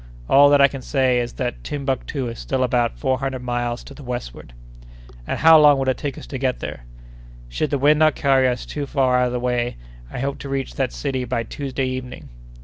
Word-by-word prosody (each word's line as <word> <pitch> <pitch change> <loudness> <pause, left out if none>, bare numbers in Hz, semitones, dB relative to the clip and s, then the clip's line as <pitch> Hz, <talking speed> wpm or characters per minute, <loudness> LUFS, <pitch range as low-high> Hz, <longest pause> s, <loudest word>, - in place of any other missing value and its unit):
All 145 +1 +6
that 145 0 +5
I 140 - +8
can 135 -1 -8
say 130 -2 +1
is, 120 -1 -3
that 125 -1 -4
Timbuctoo 135 -2 -3
is 115 0 -7
still 130 -1 -1
about 120 -2 0
four 130 -2 0
hundred 135 -2 -4
miles 120 0 -2
to - - -12
the 145 - -13
westward. 120 - -7 0.8
"And - - -2
how 160 -1 +7
long 145 -2 +6
will 135 0 -1
it 130 - +1
take 145 -2 -4
us - - -9
to 135 - -6
get 130 -1 -1
there?" 75 -4 -7 0.6
"Should 100 - -2
the 140 - 0
wind 150 +3 +4
not 155 -1 +4
carry 135 -2 +3
us 125 -1 -2
too 145 -2 -5
far 130 -3 +2
out 125 - +2
of 125 - -4
the 125 - -1
way, 120 - -1 0.3
I - - -7
hope 135 +2 -3
to 140 - -7
reach 135 - -3
that - - -1
city 125 - -3
by 125 -1 -2
Tuesday 135 +2 -4
evening." 130 -1 -6
130 Hz, 230 wpm, -21 LUFS, 125-140 Hz, 0.8 s, I